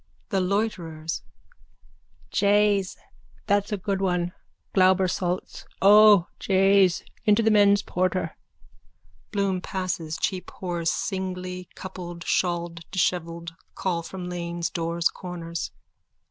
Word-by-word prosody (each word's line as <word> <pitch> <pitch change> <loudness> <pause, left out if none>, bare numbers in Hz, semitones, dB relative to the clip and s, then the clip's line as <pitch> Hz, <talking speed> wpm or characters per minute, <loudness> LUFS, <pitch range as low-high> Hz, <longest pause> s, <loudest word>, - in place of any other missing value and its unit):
THE 195 -3 +1
LOITERERS: 180 -5 -2 1.1
Jays, 205 -1 +2 0.5
that's 205 0 +1
a 210 - 0
good 195 0 -2
one. 180 -2 0 0.4
Glauber 185 0 +4
salts. 180 0 -3
O 205 -2 +7
jays, 195 -2 +4 0.2
into 210 +2 +4
the 220 - +4
men's 205 -1 +5
porter. 185 -2 -1 1.0
_(Bloom 195 -2 0
passes. 175 -5 -3
Cheap 185 -2 -2
whores, 175 -3 -2
singly, 180 -1 -3
coupled, 175 -2 -7
shawled, 175 -2 0
dishevelled, 170 -2 -1 0.2
call 175 -3 -1
from 180 +2 -7
lanes, 170 -1 -3
doors, 170 -1 0
corners.) 170 -2 -5
185 Hz, 105 wpm, -25 LUFS, 170-195 Hz, 1.1 s, O